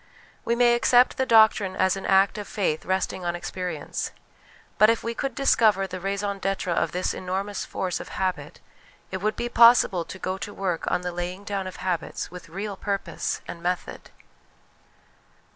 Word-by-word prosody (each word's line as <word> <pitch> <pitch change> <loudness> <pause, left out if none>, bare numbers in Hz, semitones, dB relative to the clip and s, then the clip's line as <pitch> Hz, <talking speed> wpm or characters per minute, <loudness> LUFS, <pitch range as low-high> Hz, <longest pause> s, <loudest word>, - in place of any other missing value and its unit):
We 235 - +1
may 240 0 +5
accept 245 +1 +4
the 260 - 0
doctrine 220 -4 +5
as 190 0 +2
an 195 - -5
act 195 +2 +3
of 205 - -6
frith 170 -7 -1
resting 190 0 -1
on 175 0 -1
experience; 175 -3 -4 0.7
but 215 +1 +7
if 230 - +1
we 230 - -2
could 270 +1 -3
discover 220 -8 +3
the 185 -1 -6
raison 200 +1 -2
d'etre 195 -2 -1
of - - 0
this 180 +1 -1
enormous 190 +2 -3
force 185 -2 -3
of - - -8
habit 185 -1 -3 0.5
It 190 - -2
would 215 +3 -1
be 240 - -2
possible 235 -7 +5
to 185 - -9
go 185 0 -3
to 205 - -6
work 180 -4 -2
on - - 0
the 180 0 -3
laying 175 +3 -5
down 200 -2 -3
of 185 - -7
habits 180 -3 -3
with 180 -1 -10
real 200 +4 -5
purpose 200 0 -3
and 170 - -7
method. 180 +1 -3
195 Hz, 175 wpm, -25 LUFS, 180-215 Hz, 0.7 s, but